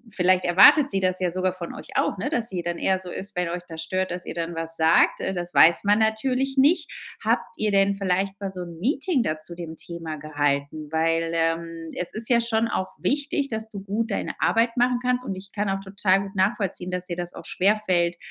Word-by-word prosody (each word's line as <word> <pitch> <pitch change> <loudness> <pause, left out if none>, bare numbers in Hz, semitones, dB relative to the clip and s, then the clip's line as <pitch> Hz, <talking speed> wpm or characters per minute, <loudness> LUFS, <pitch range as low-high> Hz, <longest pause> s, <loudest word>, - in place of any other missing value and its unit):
vielleicht 185 0 +3
erwartet 205 - +7
sie 195 - 0
das 185 -1 0
ja 180 -1 +1
sogar 185 0 0
von 175 -2 -7
euch - - -11
auch, - - +1
ne, - - -2
dass 235 -5 -1
sie 180 -3 -4
dann 175 0 -3
eher 190 - +2
so 180 -1 -8
ist, 200 +2 -6
wenn 180 -1 -1
euch 175 +1 -3
da 165 - -8
stört, 185 +4 -2
dass 180 0 -5
ihr - - -5
dann 170 0 -4
was 165 0 -4
sagt. 160 0 +4
Äh, 190 - -2
das 175 0 -5
weiß 170 +1 +6
man 205 +2 +3
natürlich 255 +5 0
nicht. 310 +4 +3 0.3
Habt - - +1
ihr 215 - 0
denn 195 0 +3
vielleicht 195 0 -1
mal 195 -1 -3
so 185 -1 -7
'n 170 -2 -8
Meeting 275 - +1
da 155 -6 -2
zu 155 +3 -10
dem 165 -2 -7
Thema 165 -2 -7
gehalten? 145 0 -2
Weil, 165 +1 +1
ähm, 165 0 -2
es 180 - -3
ist 220 +1 -4
ja 235 - +5
schon 230 -1 +1
auch 190 -4 -2
wichtig, 285 0 -1
dass 220 -1 -4
du 205 -3 -7
gut 215 +4 -2
deine - - -3
Arbeit 230 +1 +2
machen 245 0 +2
kannst 250 0 +1
und 195 - -4
ich 195 +2 -11
kann 205 -1 -2
auch 195 0 -1
total 195 0 +2
gut 195 +1 -9
nachvollziehen, 190 -2 0
dass 180 0 -3
dir 175 - -4
das 175 0 -5
auch - - -10
schwerfällt, 185 -4 +1
185 Hz, 235 wpm, -24 LUFS, 170-220 Hz, 0.3 s, erwartet